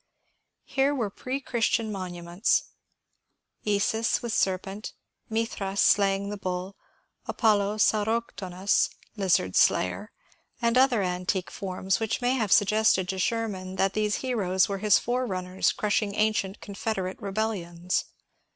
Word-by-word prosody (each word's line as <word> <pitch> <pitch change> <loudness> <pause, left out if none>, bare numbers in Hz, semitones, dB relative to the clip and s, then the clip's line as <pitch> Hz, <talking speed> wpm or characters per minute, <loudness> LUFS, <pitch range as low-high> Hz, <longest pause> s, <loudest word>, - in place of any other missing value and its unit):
Here 275 +1 +1
were 225 -7 -2
pre 255 +6 -4
Christian 230 -3 0
monuments, 180 0 -1 0.5
— - - -44
Isis 220 +4 +1
with 235 -2 -2
serpent, 195 +2 -1 0.4
Mithras 215 -3 -2
slaying 200 0 +3
the 205 - -4
Bull, 185 0 -4 0.5
Apollo 210 -2 +2
Sauroktonos 210 -3 +1 0.3
(lizard 180 - +1
slayer), 200 - +2 0.5
and 235 0 +1
other 255 -5 +4
antique 180 +1 -2
forms 190 0 -2
which 225 -1 -1
may 245 0 +1
have 220 -7 -1
suggested 210 -2 +4
to 190 - -2
Sherman 190 -3 -2
that 195 0 +1
these 210 -1 0
heroes 190 -7 +1
were 195 -1 -3
his 210 0 +5
forerunners 190 -7 -1
crushing 205 -1 -1
ancient 215 -2 0
Confederate 195 -2 -4
rebellions. 190 -4 -2
200 Hz, 120 wpm, -27 LUFS, 190-220 Hz, 0.5 s, his